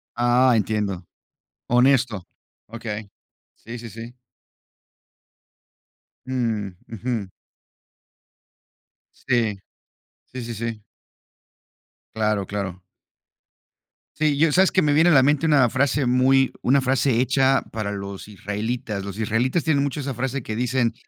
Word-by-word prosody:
Ah, 120 +1 +4
entiendo. 105 -4 -1 0.6
Honesto. 125 -5 +3 0.4
Okey. 110 -2 -6 0.5
Sí, 120 +2 -9
sí, 115 -1 -8
sí. 115 +2 -9 2.1
Mm, 115 -6 -2 0.2
ujú. 115 -3 -3 1.9
Sí. 115 -5 0 0.8
Sí, 130 - -5
sí, 115 0 -5
sí. 115 -1 -5 1.3
Claro, 105 -3 0
claro. 95 -3 -4 1.4
Sí, 150 -2 +1
yo 160 +2 +4
sabes 190 +1 +4
que 185 - +3
me 150 -2 +2
viene 160 +4 +5
a - - +5
la 135 - +6
mente 145 +3 +2
una 140 -6 +4
frase 135 +2 +1
muy 130 +2 +3
una 135 +3 +3
frase 130 -2 +1
hecha 135 +1 +3
para 105 -2 -3
los 100 0 -7
israelitas. 105 +2 -4
Los 100 +2 -7
israelitas 120 +8 0
tienen 140 -3 +2
mucho 140 +1 -3
esa 140 -2 -3
frase 135 +2 -3
que 110 -1 -5
dicen, 120 0 0
120 Hz, 115 wpm, -23 LUFS, 105-135 Hz, 2.1 s, la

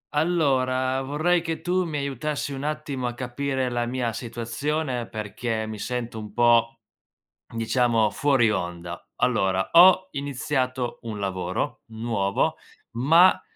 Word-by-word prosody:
Allora, 130 -5 +1
vorrei 155 +6 +1
che 165 -1 -4
tu 180 +1 0
mi 155 -3 -3
aiutassi 140 +1 -3
un 135 - -5
attimo 145 -4 -3
a 120 - -4
capire 130 +1 -2
la 120 0 -1
mia 120 -2 -2
situazione, 120 +3 -3
perché 110 +1 -3
mi 110 -1 -6
sento 120 -1 -4
un 105 -1 -8
po', 115 -1 +3 0.7
diciamo, 115 -1 +2
fuori 135 -5 +2
onda. 85 -2 -5
Allora, 95 -6 +1
ho 185 +2 +7
iniziato 130 -3 -2
un 110 -3 -5
lavoro 95 -2 -3
nuovo, 110 -3 0 0.4
ma 165 +9 +5
125 Hz, 125 wpm, -25 LUFS, 115-145 Hz, 0.7 s, ho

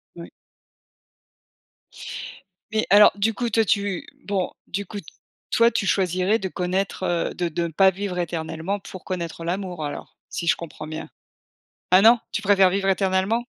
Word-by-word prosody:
Oui. - - -9 2.4
Mais 220 0 +1
alors 205 +1 +8
du 210 +2 +1
coup 240 +3 -2
toi 225 0 +3
tu 200 -2 0 0.2
bon 195 -3 -1 0.2
du 200 +1 -3
coup 205 - -8 0.5
toi, 230 +1 +4
tu 195 - -1
choisirais 185 +3 +2
de 190 - -3
connaître, 185 +2 -2
heu 175 -2 0
de 175 - -1
de 170 +1 -2
ne 165 - -8
pas 190 +5 +5
vivre 190 -1 -4
éternellement 170 +3 -3
pour 185 -1 -10
connaître 170 -3 -4
l'amour 180 -3 -3
alors 145 - -7
si - - -4
je - - +4
comprends 155 -2 -8
bien? 155 +1 -6 0.8
Ah 185 +1 +7
non, 230 +3 +7
tu 205 - -3
préfères 195 -2 +5
vivre 195 +1 0
éternellement? 190 +4 +1
190 Hz, 160 wpm, -23 LUFS, 175-205 Hz, 2.4 s, alors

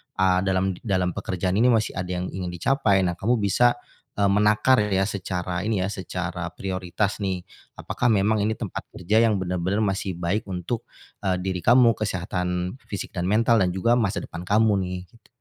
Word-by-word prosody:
ah, 95 -1 +3
dalam 95 0 +1 0.2
dalam 90 -2 +1
pekerjaan 95 +2 -2
ini 125 - +5
masih 110 -3 0
ada 90 0 -3
yang 90 - -4
ingin 90 -1 -4
dicapai. 100 - +2
Nah 90 -2 -1
kamu 115 +6 +1
bisa, 120 +5 +3 0.4
eee, 100 -1 +3
menakar 105 +6 +4 0.2
yah 95 0 +2
secara 90 -2 -3
ini 105 -4 0
ya, 95 - -1
secara 90 -2 -4
prioritas 95 +1 -2
nih. 95 -2 -2 0.3
Apakah 125 - -2
memang 105 +2 +2
ini 110 - +1
tempat - - -5
kerja 105 +6 +1
yang 105 - +1
benar-benar 90 +3 -1
masih 95 -1 -1
baik 90 +5 -1
untuk, 95 +6 -3 0.4
eee, 95 -1 +2
diri 95 -1 -2
kamu, 120 -1 +6
kesehatan 90 0 -2
fisik 100 - -5
dan 90 -1 -2
mental 115 +1 +3
dan 90 - +3
juga 115 +6 +2
masa 105 -5 0
depan 85 - -7
kamu 105 +1 +4
nih? 90 0 -4
Gitu. 115 -2 -23
95 Hz, 180 wpm, -24 LUFS, 90-105 Hz, 0.4 s, kamu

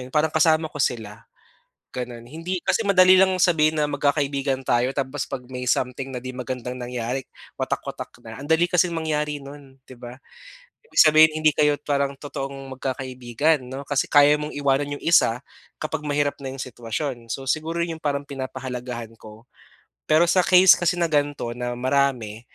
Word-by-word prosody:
'yon? 125 - -8
Parang 155 0 +1
kasama 160 0 +2
ko 145 - -5
sila. 115 -2 -3 0.6
Gano'n, 120 -2 -6
hindi 165 +8 -5
kasi 225 -3 0
madali 185 -1 +6
lang 190 -1 +4
sabihin 160 -4 +3
na 150 - +1
magkakaibigan 140 -2 0
tayo, 125 +1 +1
tapos 140 0 -3
'pag 130 -2 -6
may 125 0 -5
something 125 +2 -1
na 125 - -6
'di 130 - -5
magandang 125 0 -5
nangyari 125 +1 -3 0.4
watak - - -2
watak - - -7
na 115 +2 -10
ang 145 - -8
dali 160 +1 +3
kasing 175 -1 +1
mangyari 150 -2 -2
no'n, 140 -1 -12
'di 130 -2 -15
ba. 120 0 -9 0.7
Ibig 460 - -18
sabihin 155 0 +7
hindi 155 -1 +3
kayo 150 -1 +2
parang 140 -1 -1
totoong 135 -1 -7
magkakaibigan 130 +2 -1
'no, 135 +2 -7
kasi 145 -1 -1
kaya 145 0 +6
mong 150 0 -2
iwanan 145 +1 0
'yong - - -13
isa 140 -6 +3 0.3
kapag 155 0 -4
mahirap 145 -1 0
na 135 - -5
'yong 135 - -8
sitwasyon. 120 0 -5
So 135 +3 -4
siguro 165 +5 -1
'yong 165 -2 -7
parang 140 -1 -2
pinapahalagahan 125 -4 -6
ko. 110 +1 -15 0.6
Pero 155 +2 +5
sa 180 +2 +3
case 185 +1 +7
kasi 175 +1 0
na 170 - +2
ganito 145 -6 -1
na 120 0 -4
marami, 125 -5 0
140 Hz, 175 wpm, -23 LUFS, 125-155 Hz, 0.7 s, sabihin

